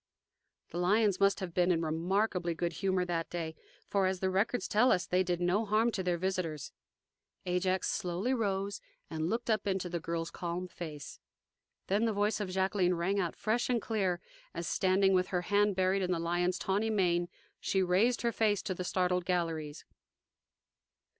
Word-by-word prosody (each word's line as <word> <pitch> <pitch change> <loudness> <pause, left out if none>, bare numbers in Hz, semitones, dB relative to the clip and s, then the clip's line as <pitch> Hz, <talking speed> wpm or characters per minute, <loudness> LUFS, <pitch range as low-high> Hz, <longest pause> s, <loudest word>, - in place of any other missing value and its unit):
The 175 - -3
lions 200 +2 +3
must 200 +1 +3
have 180 -3 -4
been 180 0 +2
in 165 -1 +1
remarkably 175 +2 0
good 170 +1 -2
humor 190 +2 0
on - - 0
that 170 -2 -2
day, 165 -2 -4 0.3
for, 195 -2 +2
as 185 -1 -1
the 190 0 0
records 205 +6 0
tell 245 +5 +4
us, 180 - +2
they 180 +1 +2
did 175 -2 -1
no 180 +5 +2
harm 220 +2 +2
to 195 - -2
their 180 -2 0
visitors. 175 -5 -2 0.7
Ajax 185 +1 0
slowly 180 +8 -1
rose 200 -4 -1 0.3
and 160 +1 -1
looked 235 +3 -2
up 215 -1 0
into 190 -2 -1
the 170 0 -2
girl's 165 0 -3
calm 175 +1 -4
face. 155 -5 -8 0.7
Then 205 +4 +1
the 225 - +1
voice 205 +2 +1
of 205 -3 -3
Jacqueline 190 -1 +1
rang 190 +4 0
out 175 -4 -1
fresh 225 +4 0
and 245 -2 +2
clear 195 -6 -1 0.4
as, 170 - -3
standing 190 +1 +3
with 185 0 +3
her 180 -2 -1
hand 205 +1 +2
buried 190 +1 +2
in 185 -1 0
the 175 - +1
lion's 175 +2 0
tawny 205 +3 0
mane, 175 -4 +1 0.3
she 190 -1 +1
raised 200 +8 +2
her 235 - +2
face 210 -3 +1
to 190 - -2
the 180 - -5
startled 180 0 +1
galleries. 165 -4 -2
185 Hz, 185 wpm, -32 LUFS, 175-200 Hz, 0.7 s, tell